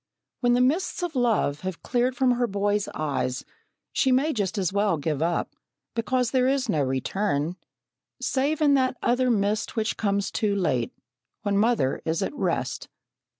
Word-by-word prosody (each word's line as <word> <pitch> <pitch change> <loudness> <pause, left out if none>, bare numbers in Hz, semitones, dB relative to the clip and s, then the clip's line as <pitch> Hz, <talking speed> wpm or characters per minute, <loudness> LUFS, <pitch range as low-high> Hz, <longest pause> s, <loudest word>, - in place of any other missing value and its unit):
When 245 -1 +3
the 245 - +3
mists 330 +8 +1
of 345 -4 -3
love 225 - +1
have 185 -1 -6
cleared 250 +1 +1
from 260 -1 +3
her 245 0 +1
boy's 205 0 0
eyes, 130 -4 -2 0.5
she 265 - +2
may 280 +5 +3
just 205 -2 -2
as 190 -1 0
well 200 -4 +2
give 150 0 -2
up, 170 +1 -1 0.4
because 245 +1 0
there 255 -1 +3
is 270 0 +1
no 150 - +1
return, 145 +5 -1 0.6
save 280 +4 0
in 290 -2 +5
that 260 -2 +2
other 250 +1 +2
mist 210 0 0
which 220 -1 -1
comes 200 -2 0
too 210 -3 0
late, 130 -11 0 0.5
when 205 -1 0
mother 205 - +2
is 165 +4 -1
at - - -3
rest. - - -2
215 Hz, 165 wpm, -26 LUFS, 180-255 Hz, 0.6 s, in